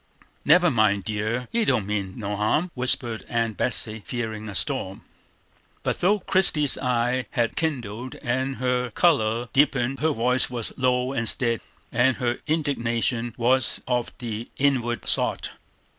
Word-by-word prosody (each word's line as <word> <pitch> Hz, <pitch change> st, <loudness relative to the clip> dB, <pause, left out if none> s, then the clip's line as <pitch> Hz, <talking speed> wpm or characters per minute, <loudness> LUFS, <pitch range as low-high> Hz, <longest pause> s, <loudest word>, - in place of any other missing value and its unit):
"Never 175 Hz, +3 st, +5 dB
mind, 105 Hz, -4 st, +2 dB
dear, 110 Hz, +4 st, -2 dB
he 230 Hz, 0 st, +1 dB
don't 120 Hz, -, +1 dB
mean 100 Hz, -2 st, -3 dB
no 105 Hz, -2 st, -3 dB
harm!" 130 Hz, -, 0 dB
whispered 125 Hz, -3 st, -1 dB
Aunt 115 Hz, -2 st, -1 dB
Betsey, 110 Hz, -2 st, 0 dB
fearing 110 Hz, -3 st, -5 dB
a 100 Hz, -, -7 dB
storm. 95 Hz, +2 st, -3 dB, 0.8 s
But -, -, -1 dB
though 200 Hz, +3 st, +3 dB
Christie's 165 Hz, -7 st, +4 dB
eyes 125 Hz, 0 st, 0 dB
had 115 Hz, -1 st, -1 dB
kindled 125 Hz, -6 st, -3 dB
and 130 Hz, +2 st, -2 dB
her 125 Hz, -1 st, -1 dB
color 120 Hz, -5 st, +1 dB
deepened, 135 Hz, -2 st, +2 dB
her 160 Hz, -, +2 dB
voice 125 Hz, -2 st, +1 dB
was 120 Hz, -3 st, -4 dB
low 125 Hz, 0 st, 0 dB
and 115 Hz, -3 st, +4 dB
steady, 115 Hz, -3 st, +1 dB, 0.3 s
and 125 Hz, +2 st, +2 dB
her 120 Hz, -2 st, -1 dB
indignation 120 Hz, -6 st, -1 dB
was 125 Hz, +1 st, +2 dB
of 125 Hz, -2 st, -1 dB
the 115 Hz, -1 st, -6 dB
inward 125 Hz, -4 st, 0 dB
sort. -, -, 0 dB
120 Hz, 145 wpm, -24 LUFS, 115-130 Hz, 0.8 s, Never